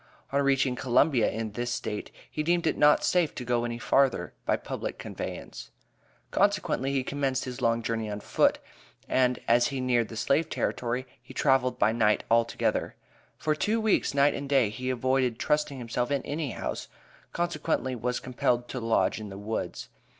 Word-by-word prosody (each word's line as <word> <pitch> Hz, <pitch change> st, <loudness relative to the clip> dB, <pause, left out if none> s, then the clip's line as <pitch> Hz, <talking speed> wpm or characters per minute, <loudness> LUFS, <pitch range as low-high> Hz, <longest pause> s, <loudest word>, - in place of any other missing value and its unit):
On 140 Hz, +1 st, +2 dB
reaching 135 Hz, -2 st, +2 dB
Columbia 125 Hz, 0 st, +3 dB
in 110 Hz, -1 st, -4 dB
this 120 Hz, +3 st, -3 dB
State, 110 Hz, -3 st, -4 dB, 0.2 s
he 155 Hz, -, -2 dB
deemed 170 Hz, +2 st, +1 dB
it 155 Hz, -, +2 dB
not 150 Hz, 0 st, +5 dB
safe 175 Hz, -4 st, +2 dB
to 125 Hz, -, -5 dB
go 120 Hz, 0 st, +1 dB
any 120 Hz, 0 st, -3 dB
further 130 Hz, +2 st, +2 dB
by -, -, +3 dB
public -, -, -5 dB
conveyance, -, -, -7 dB, 0.6 s
consequently 190 Hz, -9 st, +1 dB
he 135 Hz, -2 st, 0 dB
commenced 135 Hz, -1 st, -1 dB
his 125 Hz, 0 st, -6 dB
long 115 Hz, -1 st, +2 dB
journey 115 Hz, -1 st, -2 dB
on 105 Hz, 0 st, -4 dB
foot, -, -, +2 dB, 0.5 s
and 125 Hz, -1 st, +2 dB
as 120 Hz, +1 st, +4 dB
he 135 Hz, -, -3 dB
neared 120 Hz, -3 st, +1 dB
the 115 Hz, -, -9 dB
slave 150 Hz, +8 st, +1 dB
territory 125 Hz, +1 st, -2 dB, 0.2 s
he 125 Hz, -, -14 dB
traveled 135 Hz, -2 st, +2 dB
by 110 Hz, -, +3 dB
night 110 Hz, -2 st, +2 dB
altogether. 115 Hz, 0 st, +1 dB, 0.4 s
For 155 Hz, -, 0 dB
two 210 Hz, +9 st, 0 dB
weeks, 215 Hz, -9 st, +1 dB
night 140 Hz, +1 st, +4 dB
and 140 Hz, 0 st, -5 dB
day, 130 Hz, -7 st, +3 dB
he 130 Hz, +3 st, -4 dB
avoided 130 Hz, -1 st, +1 dB
trusting 150 Hz, 0 st, 0 dB
himself 120 Hz, 0 st, -2 dB
in 140 Hz, -1 st, 0 dB
any 150 Hz, 0 st, -3 dB
house, -, -, -4 dB, 0.4 s
consequently 165 Hz, -6 st, -1 dB
was 125 Hz, +1 st, -2 dB
compelled 120 Hz, -1 st, 0 dB
to 130 Hz, -, -4 dB
lodge 115 Hz, -1 st, +1 dB
in 105 Hz, -1 st, -7 dB
the 95 Hz, -, -8 dB
woods. 105 Hz, +2 st, -4 dB
125 Hz, 175 wpm, -28 LUFS, 115-140 Hz, 0.6 s, not